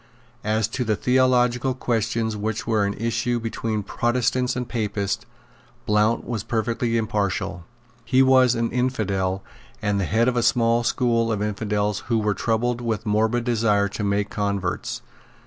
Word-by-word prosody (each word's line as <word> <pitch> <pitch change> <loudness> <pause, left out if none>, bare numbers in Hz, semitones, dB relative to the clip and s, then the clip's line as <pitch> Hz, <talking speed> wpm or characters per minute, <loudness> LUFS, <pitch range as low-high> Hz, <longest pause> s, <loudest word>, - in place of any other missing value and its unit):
As 110 0 +1
to 125 +2 -2
the 110 -2 +1
theological 125 +1 +2
questions 115 -2 -1
which 110 +1 -3
were 110 -3 +2
in 100 - -3
issue 120 +2 -1
between 110 -2 -3
Protestants 125 +3 0
and 125 -1 -3
Papists, 105 -3 -2 0.6
Blount 105 +2 +2
was 115 -3 -3
perfectly 115 +1 -1
impartial. 105 -5 -2 0.4
He 130 +3 +4
was 130 -2 +5
an 115 0 -1
infidel, 100 -7 -1 0.4
and 105 -1 0
the 95 - 0
head 115 +5 +2
of 125 - +1
a 120 - +2
small 115 0 +3
school 115 -1 +1
of 105 -2 -1
infidels 105 -1 -1
who 115 -1 +2
were 105 -1 +1
troubled 120 +4 0
with 110 -3 -2
a - - -2
morbid 110 +3 +2
desire 110 -4 +2
to 105 - -5
make 100 0 0
converts. 100 -3 -2
115 Hz, 155 wpm, -23 LUFS, 105-120 Hz, 0.6 s, was